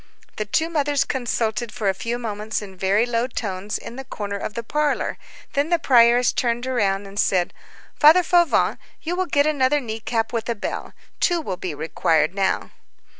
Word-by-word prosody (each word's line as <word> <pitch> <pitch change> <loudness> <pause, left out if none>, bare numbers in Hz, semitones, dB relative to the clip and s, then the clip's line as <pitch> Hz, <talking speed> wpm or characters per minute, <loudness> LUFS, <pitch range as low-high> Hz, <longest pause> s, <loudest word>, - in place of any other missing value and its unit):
The 215 - -2
two 315 +10 +1
mothers 290 -3 +1
consulted 235 -3 -2
for 220 -5 -3
a 195 - +3
few 230 +5 -3
moments 215 -2 -3
in 190 -2 -10
very 195 +4 +2
low 240 0 0
tones 205 -4 -4
in 240 - -9
the 270 - -5
corner 205 -6 -5
of 205 +1 -5
the 235 - -3
parlor, 295 +5 -1 0.3
then 285 +2 +1
the 345 - +3
prioress 245 -4 +5
turned 240 0 0
round 205 -6 0
and 200 +1 -7
said:— 180 -2 +2 0.5
"Father 320 +4 +7
Fauvent, 345 -1 +3 0.2
you 345 +2 -2
will 370 0 -1
get 285 -3 +3
another 295 -1 +2
knee 225 -4 -5
cap 225 0 -2
with 230 0 -2
a 235 - 0
bell. 205 - -5 0.3
Two 350 -2 +2
will 200 - -3
be 175 -5 -4
required 160 +1 +1
now." 195 -1 0
235 Hz, 185 wpm, -22 LUFS, 205-285 Hz, 0.5 s, Father